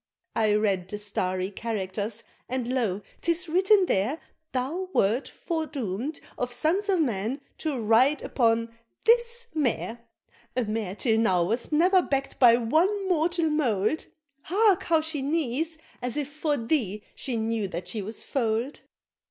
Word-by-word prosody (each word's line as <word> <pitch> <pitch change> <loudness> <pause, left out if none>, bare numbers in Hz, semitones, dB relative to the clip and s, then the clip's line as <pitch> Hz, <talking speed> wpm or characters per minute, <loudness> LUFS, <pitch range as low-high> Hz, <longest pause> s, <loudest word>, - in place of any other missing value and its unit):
I 215 -2 +3
read 195 -4 +1
the 210 - -3
starry 185 -2 -2
characters 210 0 -3 0.3
and 255 -1 -2
lo! 210 -6 0 0.2
'tis 340 +1 +1
written 380 +4 +4
there, 250 - 0 0.3
Thou 310 +9 -2
wert 220 +7 +2
foredoom'd 290 - -3 0.2
of 245 0 -1
sons 330 +12 0
of 375 -3 +3
men 235 -2 0 0.2
to 305 -4 -2
ride 235 +7 +4
upon 230 -2 +1 0.3
this 475 +1 +3
Mare, 240 -5 -1 0.6
A 250 - +3
Mare 215 -3 -3
till 220 0 +2
now 185 -6 +3
was 230 - -1
never 360 +5 +5
back'd 275 -4 -2
by 235 -2 +7
one 315 +11 +3
of 400 -2 -3
mortal 335 -1 +2
mould, 255 -2 +1 0.3
Hark, 395 +3 +3
how 325 -2 +3
she 310 -2 -3
neighs, 310 +2 -1 0.2
as 250 +2 -3
if 290 -2 -2
for 300 0 -1
thee 225 -5 -1
she 250 -4 -3
knew 220 -2 -1
that 175 -1 -6
she 210 +3 -3
was 215 +3 -6
foal'd!" 235 +1 -1
250 Hz, 150 wpm, -27 LUFS, 220-320 Hz, 0.6 s, by